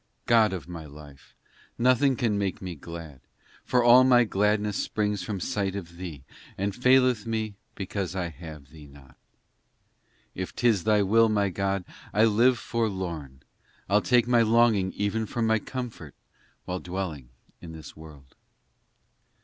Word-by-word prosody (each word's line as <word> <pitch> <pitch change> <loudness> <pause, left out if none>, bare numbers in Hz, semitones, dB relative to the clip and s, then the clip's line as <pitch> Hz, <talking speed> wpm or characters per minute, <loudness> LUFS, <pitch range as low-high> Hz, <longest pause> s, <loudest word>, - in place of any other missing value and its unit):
in - - -19
God 115 -2 +5
of 90 -6 -6
my 85 -3 -8
life! 75 -1 -15 0.4
nothing 130 +2 +3
can 115 -3 0
make 100 -2 -2
me 90 -2 -6
glad, 80 -3 -10 0.4
For 125 -1 +2
all 120 +2 +8
my 125 -2 +5
gladness 105 0 0
springs 105 -2 -1
from 100 +1 -4
sight 100 +1 -2
of 85 -3 -8
Thee, 85 -7 -8 0.3
And 100 +1 -2
faileth 125 -3 +3
me 110 -2 -2 0.2
because 95 -2 -4
I 90 -2 -2
have 80 -4 -11
Thee 75 -2 -13
not. 70 -2 -17
IV - - -25 1.2
If 95 0 -6
tis 115 -7 +2
Thy 105 -2 +3
will, 115 +3 +4
my 100 -2 +1
God, 95 0 -2 0.3
I 110 +2 +5
live 120 +3 +4
forlorn, 90 - -4 0.4
I 100 - +3
ll - - +2
take 120 0 +3
my 120 -1 +4
longings 110 -4 +3
even 105 +2 -1
for 115 +3 -2
my 110 0 +2
comfort 120 - -7 0.5
While 90 0 -3
dwelling 90 -9 -5 0.3
in 85 - -9
this 80 -1 -11
world. 75 -4 -14
100 Hz, 155 wpm, -26 LUFS, 85-115 Hz, 1.2 s, all